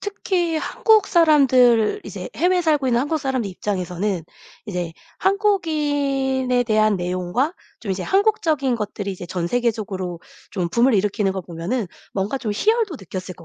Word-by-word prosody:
특히 360 -5 -1
한국 430 +6 +3
사람들 270 - +4
이제 - - -7
해외에 360 +1 +2
살고 300 -5 +1
있는 235 -1 +2
한국 295 +4 -1
사람들 260 -6 -2
입장에서는 185 -1 -3 0.4
이제 175 -4 -3 0.3
한국인에 290 -10 +1
대한 215 -2 +3
내용과 180 - -1 0.2
좀 195 -4 -3
이제 185 0 -4
한국적인 330 - +1
것들이 205 -2 -4
이제 180 -1 -8
전세계적으로 190 -1 -2 0.3
좀 180 -4 -2
붐을 235 +6 +3
일으키는 205 0 +1
걸 190 -1 -4
보면은 180 +7 -3 0.3
뭔가 200 +7 -1
좀 225 -5 -3
희열도 430 - +1
느꼈을 185 -1 -7
것 170 - -14
240 Hz, 340 characters per minute, -21 LUFS, 190-310 Hz, 0.4 s, 사람들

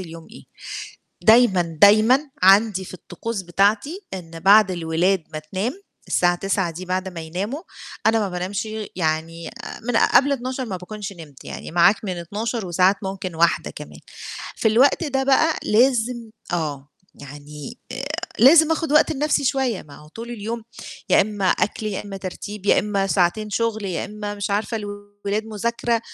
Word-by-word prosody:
اليوم 165 -2 -9
إيه. - - -13 0.8
دايمًا، 220 -5 +5 0.2
دايمًا 215 +6 +7 0.2
عندي 195 0 +5
في - - -10
الطقوس 210 +4 -5
بتاعتي 205 - 0
إن 165 -3 -8
بعد 200 +2 +6
الولاد 170 +2 0
ما 155 - -3
تنام 195 - -4 0.3
الساعة 175 0 +2
21:00 190 -1 -1
دي 180 +3 -8
بعد 185 +1 -2
ما 180 -3 -7
يناموا، 195 - -4 0.5
أنا 225 0 +4
ما 205 -2 -1
بانامش 185 +4 -3 0.3
يعني 165 0 -2
آآ 235 - -9
من 245 -2 +2
قبل 280 +1 +4
00:00 260 0 -2
ما 195 -5 -4
باكونش 200 +2 -7
نِمت، 155 -6 -13
يعني - - -7
معاك 175 +6 +4
من 185 -3 -3
00:00، 210 +6 -4
وساعات 180 +3 +3
ممكن 190 -2 -5
01:00 170 +1 +2
كمان. - - -10 0.6
في 220 - +2
الوقت 255 +9 +4
ده 270 -3 0
بقى 290 +4 +3
لازم 235 0 +2 0.2
آه، 145 -5 -3 0.3
يعني 145 - -10
آآ 265 - -4 0.3
لازم 315 +6 +7
آخُد 320 -2 -2
وقت 305 +1 +5
لنَفْسي 295 0 0
شوية، 260 -5 0
ما 145 -2 -14
هو 150 - -15
طول 230 +8 -9
اليوم 230 0 -5 0.5
يا - - +6
إمّا 205 -2 -1
أكل، 215 +3 0
يا 205 -1 -3
إمّا 195 -1 -7
ترتيب، 195 +2 -7
يا - - +5
إمّا 200 -1 0
ساعتين 195 +3 +1
شُغل، 220 0 -1
يا 185 -4 -2
إمّا 210 0 -6
مش 205 0 -4
عارفة 210 +3 -1
الولاد 205 0 -5
مذاكرة، 230 +2 -1
205 Hz, 165 wpm, -22 LUFS, 180-230 Hz, 0.8 s, دايمًا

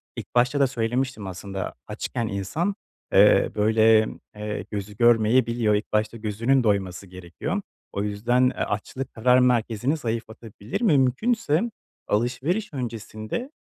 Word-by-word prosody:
ilk - - -9
başta 125 +4 +3
da 140 - +5
söylemiştim 120 -2 -2
aslında 95 +1 -5
açken 115 - -3
insan, 110 - -2 0.4
eee, - - +6
böyle, 110 +1 +4 0.3
eee, 105 0 -4
gözü 105 0 -5
görmeyebiliyor, 115 -1 +3
ilk 105 - -3
başta 110 +2 0
gözünün 115 +5 +1
doyması 100 -3 -1
gerekiyor. 90 - -5 0.3
O 100 - -1
yüzden, 110 +5 +1
eee, - - -8
açlık, 120 +5 -4
karar 125 +3 +4
merkezini 125 +2 +1
zayıflatabilir. 110 - -5
Mümkünse 155 - +2 0.5
alışveriş 135 - -1
öncesinde 115 - -5
115 Hz, 120 wpm, -24 LUFS, 105-130 Hz, 0.5 s, eee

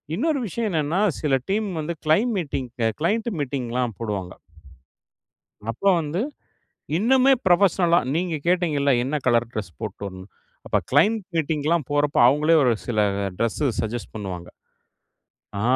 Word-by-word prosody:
இன்னொரு 295 - 0
விஷயம் 225 +4 -2
என்னன்னா, 160 +4 0 0.2
சில 145 -3 0 0.2
டீம் 210 +1 0
வந்து 170 +3 -3
கிளைம் 210 +11 +3
மீட்டிங் 135 -7 -3 0.3
கிளையன்ட் 220 +7 +1
மீட்டிங்லாம் 125 -4 -2
போடுவாங்க. 100 -5 -4 1.4
அப்ப 125 - -10 0.2
வந்து 160 +6 -2 0.8
இன்னுமே 260 +5 +4
புரொபஷனல்லா 175 -1 +4
நீங்க 170 0 -1
கேட்டீங்கல்ல 155 -6 +2
என்ன 140 +4 -2
கலர் 120 -2 +3
டிரெஸ் 105 -7 -5
போட்டு 105 -2 -6
வரணும்னு 95 0 -8 0.4
அப்போ - - +1
கிளையன்ட் 205 +10 +4
மீட்டிங்லாம் 155 -1 0
போறப்போ 145 -1 +1
அவங்களே 150 +5 +4
ஒரு 125 - +4
சில 115 -3 -1 0.4
டிரெஸ் 115 +5 -1 0.2
சஜெஸ்ட் 110 -2 -3
பண்ணுவாங்க. 95 -5 -6 1.1
ஆ - - -2
150 Hz, 125 wpm, -23 LUFS, 120-180 Hz, 1.4 s, இன்னுமே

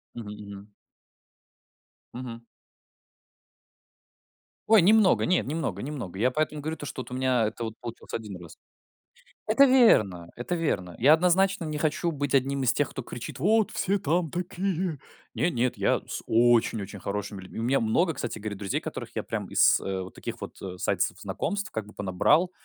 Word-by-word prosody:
Мгм, 115 -3 -7
мгм. 100 0 -10 1.4
Мгм. 120 -2 -7 2.3
Ой, 220 -4 +7
немного, 210 +1 +5
нет, 180 - +2
немного 140 - -3
немного. 125 -10 -6
Я 125 +4 +3
поэтому 155 +1 -1
говорю, 160 +2 -4
то 145 - -7
что 130 - -5
вот - - -11
у - - -5
меня 130 -3 +2
это 115 +2 -5
вот 110 0 -6
получилось 120 -1 -9
1 105 -5 -5
раз. 85 - -12 0.9
Это 225 +6 +6
верно, 105 - +4
это 125 +9 -3
верно. 90 - -2
Я 140 +6 +6
однозначно 180 +2 +3
не 155 -1 -3
хочу 160 +3 0
быть 145 -2 -3
одним 135 0 +2
из 120 - +3
тех, 145 - 0
кто 135 - -6
кричит: 120 +3 -7
"Вот 215 +7 +3
все 200 +1 0
там 165 0 0
такие!" 180 -3 -2 0.4
Нет, 175 - +1
нет, 125 +1 0
я - - +2
с - - -5
очень 115 -1 +3
очень 100 0 -8
хорошими 100 0 -4
людьми 95 - -9
У - - -2
меня 135 +3 +2
много, 160 +10 +2
кстати 120 -5 -4
говоря, 105 -1 -4
друзей, 95 -2 -2
которых - - -7
я - - 0
прям - - -4
из, - - +5
э, 95 -1 -3
вот 95 - -9
таких - - -7
вот, - - -8
э, 90 -1 -6
сайтов - - +1
знакомств, 205 +2 -3
как 110 -2 -4
бы, 105 - -14
понабрал. 105 - +2
130 Hz, 175 wpm, -27 LUFS, 105-170 Hz, 2.3 s, Ой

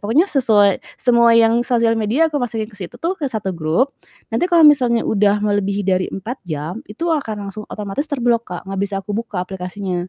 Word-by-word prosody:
pokoknya 235 - +3
sesuai 210 -8 +3 0.2
semua 235 -1 +4
yang 230 +1 +4
sosial 230 -2 +2
media 255 +10 +2
aku 290 - 0
masukin 225 -3 -2
ke 215 - -17
situ 185 +6 -7
tuh 335 +8 -1
ke 280 - -1
satu 210 -5 -3
grup, 170 - 0 0.4
nanti 235 +11 +1
kalau 340 -3 +5
misalnya 250 -6 +4
udah 205 -1 +2
melebihi 205 -1 0
dari 185 -1 +1
4 225 +7 -6
jam, 155 +3 -4
itu 210 +11 -6
akan 250 -9 -2
langsung 215 +2 -8
otomatis 210 +9 -4
terblok, 240 -5 0
Kak, 175 -1 -5
nggak 195 0 -4
bisa 200 0 -2
aku 205 - -5
buka 210 -4 -3
aplikasinya. 185 -1 -5
215 Hz, 195 wpm, -19 LUFS, 195-245 Hz, 0.4 s, kalau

